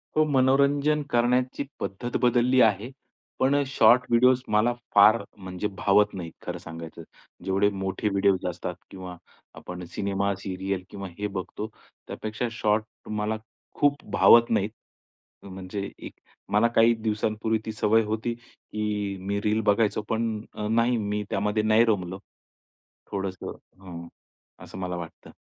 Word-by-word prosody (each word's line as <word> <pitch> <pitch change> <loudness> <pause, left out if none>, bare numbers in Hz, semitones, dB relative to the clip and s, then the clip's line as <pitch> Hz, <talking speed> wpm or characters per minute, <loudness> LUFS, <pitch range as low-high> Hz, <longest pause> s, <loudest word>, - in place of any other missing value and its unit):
हो, 155 - +5
मनोरंजन 140 +2 +3
करण्याची 125 +2 +1 0.2
पद्धत 120 +5 -3
बदलली 125 +1 +4
आहे. 110 +2 +3 0.5
पण 135 +2 +3
अ, 145 - +3
शॉर्ट 125 -2 +5
व्हिडिओज 125 +2 +4
मला 105 +3 +2 0.2
फार 105 +2 +7
म्हणजे 95 +1 -4
भावत 105 +1 +3
नाहीत 85 -4 -6
खरं - - -4
सांगायचं. 80 -1 -9 0.4
जेवढे 95 +2 +2
मोठे 95 +1 -2
व्हिडिओज 100 -1 +2
असतात 90 0 -5
किंवा 90 -2 -8 0.4
आपण 90 0 -8
सिनेमा, 100 0 0
सीरियल 95 -1 -4
किंवा 100 -1 -7
हे 105 0 -2
बघतो, 100 +2 -5 0.4
त्यापेक्षा 110 +3 -4
शॉर्ट 110 0 -2
मला 105 +1 -1 0.4
खूप 145 0 +2
भावत 115 0 +6
नाहीत. 105 -2 +1 0.7
म्हणजे 95 +1 -6
एक - - -9 0.4
मला 105 +3 +4
काही 115 +1 +6
दिवसांपूर्वी 110 0 -1
ती 110 - -3
सवय 110 +1 +3
होती 110 +2 -2
की 105 -4 -5
मी 100 +2 -2
रील 105 +1 +1
बघायचो 110 +1 +1
पण 110 -1 -1
अ, 105 - -4
नाही 115 +2 +2
मी 105 -1 -2
त्यामध्ये 105 +2 0
नाही 110 +2 +5
रमलो. 95 -4 -1 0.9
थोडंसं 95 -1 -4 0.3
हं, 85 -3 -9 0.6
असं - - -10
मला 90 -1 -3
वाटतं. 85 -1 -9
105 Hz, 135 wpm, -26 LUFS, 95-115 Hz, 0.9 s, फार